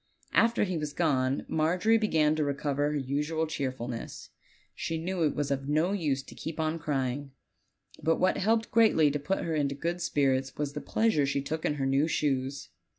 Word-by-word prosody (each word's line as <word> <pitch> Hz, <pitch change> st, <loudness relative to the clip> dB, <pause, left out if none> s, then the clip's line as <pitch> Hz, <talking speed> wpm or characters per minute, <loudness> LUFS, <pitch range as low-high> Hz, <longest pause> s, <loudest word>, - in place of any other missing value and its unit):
After 230 Hz, +1 st, +4 dB
he 185 Hz, -5 st, -1 dB
was 150 Hz, -1 st, -4 dB
gone 135 Hz, -5 st, +1 dB
Margery 180 Hz, +8 st, +2 dB
began 155 Hz, -8 st, +2 dB
to 155 Hz, -, 0 dB
recover 145 Hz, 0 st, 0 dB
her -, -, 0 dB
usual 150 Hz, +4 st, -1 dB
cheerfulness. 130 Hz, -6 st, -5 dB, 0.4 s
She 165 Hz, -, -3 dB
knew 175 Hz, +2 st, -3 dB
it 155 Hz, -3 st, +2 dB
was 145 Hz, -1 st, -1 dB
of 135 Hz, 0 st, -2 dB
no 155 Hz, +5 st, +2 dB
use 150 Hz, -9 st, 0 dB
to -, -, -12 dB
keep 160 Hz, 0 st, -6 dB
on 160 Hz, +1 st, 0 dB
cry 140 Hz, -5 st, 0 dB
ing; 140 Hz, +2 st, -7 dB, 0.7 s
but 165 Hz, +1 st, +2 dB
what 185 Hz, 0 st, +2 dB
helped 225 Hz, +3 st, +1 dB
greatly 215 Hz, -10 st, +5 dB
to 150 Hz, -, -2 dB
put 190 Hz, +7 st, -1 dB
her 165 Hz, -, -2 dB
into 140 Hz, -2 st, 0 dB
good 170 Hz, +5 st, -3 dB
spirits 135 Hz, -4 st, 0 dB
was 145 Hz, -1 st, -2 dB
the 150 Hz, -, -5 dB
pleasure 220 Hz, -11 st, +1 dB
she 135 Hz, 0 st, -1 dB
took 160 Hz, +3 st, -3 dB
in 150 Hz, -, +1 dB
her 135 Hz, -2 st, -2 dB
new 135 Hz, +3 st, +2 dB
shoes. 140 Hz, -3 st, -1 dB
150 Hz, 195 wpm, -29 LUFS, 140-165 Hz, 0.7 s, greatly